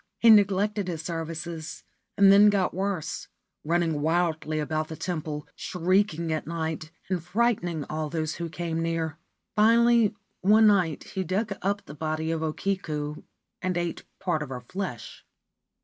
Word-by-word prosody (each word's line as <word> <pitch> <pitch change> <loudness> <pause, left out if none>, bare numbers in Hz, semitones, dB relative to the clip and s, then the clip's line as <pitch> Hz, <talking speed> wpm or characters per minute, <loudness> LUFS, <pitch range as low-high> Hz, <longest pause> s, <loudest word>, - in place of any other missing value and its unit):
He 230 - +7
neglected 205 -1 +4
his 165 -3 -4
services, 165 -1 -5 0.3
and 195 -1 +7
then 205 +1 +8
got 195 -3 +1
worse, 190 -4 -3 0.4
running 165 -2 +1
wildly 160 -1 0
about 155 +1 -1
the 160 - -6
temple, 155 -3 -4
shrieking 180 -2 0
at 155 -2 -3
night 160 -1 -3 0.2
and 185 -3 -2
frightening 180 -5 0
all 155 0 -3
those 155 -1 -2
who 170 -1 -4
came 165 0 -3
near. 165 -1 -2 0.4
Finally, 230 0 +5 0.2
one 215 +4 +5
night 185 -8 +3
he 190 - -4
dug 195 +4 -1
up 200 +1 -1
the 150 - -9
body 155 +1 -2
of 165 -1 -1
O 160 -1 0
Kiku 155 -5 -3 0.4
and 185 -1 -1
ate 175 -1 -2 0.2
part 175 -5 0
of 150 - -5
her 125 -2 -5
flesh. 125 - -6
170 Hz, 150 wpm, -27 LUFS, 155-195 Hz, 0.4 s, then